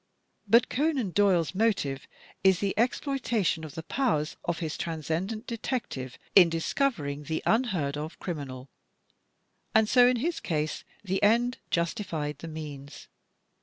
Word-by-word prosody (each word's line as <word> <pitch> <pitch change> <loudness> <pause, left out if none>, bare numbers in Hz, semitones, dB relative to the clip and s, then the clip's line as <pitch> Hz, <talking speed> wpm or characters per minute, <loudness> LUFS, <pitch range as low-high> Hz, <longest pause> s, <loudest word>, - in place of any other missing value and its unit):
But 230 +4 +5
Conan 275 - 0
Doyle's 180 -6 +3
motive 190 -10 0 0.4
is 190 -1 +5
the 195 +1 -1
exploitation 235 - 0
of 155 -3 -8
the 160 - -5
powers 160 - 0
of 170 -1 -1
his 160 -3 -3
Transcendent 170 - -3
Detective 230 - -4 0.2
in 180 -4 +9
discovering 165 - -1
the 160 +2 -2
unheard 185 - +1
of 155 +3 -6
crimi 155 -6 -4
nal, 130 0 -9 1.1
and 220 0 +5
so 245 +2 +6
in 250 - +3
his 325 +8 -1
case 155 -2 -2 0.2
the 190 -1 -1
end 235 +4 +3
justified 170 -4 -2
the 165 - -7
means. 150 -3 -8
180 Hz, 135 wpm, -28 LUFS, 155-230 Hz, 1.1 s, in